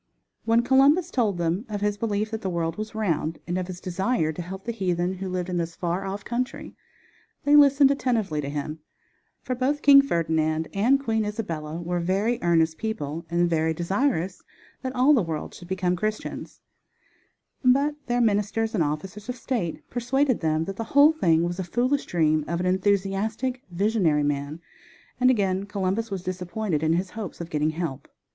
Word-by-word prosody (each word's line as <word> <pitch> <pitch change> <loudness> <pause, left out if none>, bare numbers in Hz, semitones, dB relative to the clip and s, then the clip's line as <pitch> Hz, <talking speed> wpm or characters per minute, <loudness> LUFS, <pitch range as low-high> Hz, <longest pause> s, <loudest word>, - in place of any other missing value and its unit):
When 230 +1 +3
Columbus 280 +8 +4
told 215 -7 +1
them 170 +4 0
of 205 -1 -4
his 205 0 +1
belief 210 0 -2
that 220 -1 -4
the 190 - -2
world 165 -2 -2
was 215 +1 -6
round, 165 -7 -1
and 175 - -3
of 185 -1 -2
his 180 -1 -7
desire 185 -2 -1
to 175 - -5
help 190 +3 -7
the 235 - -1
heathen 180 -4 -1
who 190 -1 -4
lived 180 -1 -2
in 180 -1 -2
this 170 -1 -3
far 175 +2 -2
off 195 +1 -5
country, 250 +2 -4 0.7
they 290 +1 +4
listened 280 -1 +6
attentively 225 - 0
to 140 - -4
him, 150 +2 -4 0.6
for 255 - -2
both 265 +4 -1
King 280 -1 +9
Ferdinand 160 - 0
and 240 +8 +3
Queen 225 -5 0
Isabella 170 -7 -4
were 175 +1 -2
very 195 +7 0
earnest 165 -2 +2
people 165 -7 -4
and 175 +1 +2
very 160 -1 +1
desirous 190 - -1 0.4
that 260 -1 -4
all 260 +4 +5
the 255 - +4
world 160 -4 -4
should 175 - -11
become 180 -1 0
Christians; 215 +4 -4 1.0
but 275 +4 +4
their 245 0 +1
ministers 220 0 +1
and 185 -7 +2
officers 185 +9 -4
of 250 - -2
state 230 -9 -3
persuaded 255 +2 +1
them 160 0 0
that 195 +1 -6
the 225 - -2
whole 290 +2 +8
thing 165 - +2
was 175 +2 -2
a - - -1
foolish 250 +10 0
dream 155 -3 +2
of 170 +1 -2
an 180 - -1
enthusiastic, 200 +6 0
visionary 180 -5 +1
man; 145 +2 -2 0.6
and 255 0 +5
again 195 -5 +1
Columbus 205 +2 -1
was 190 -2 -4
disappointed 185 -2 -2
in 160 0 +2
his 185 +2 -1
hope 215 -4 -7
of 170 0 -7
getting 150 0 +1
help. 155 -4 -4
190 Hz, 180 wpm, -25 LUFS, 170-230 Hz, 1.0 s, King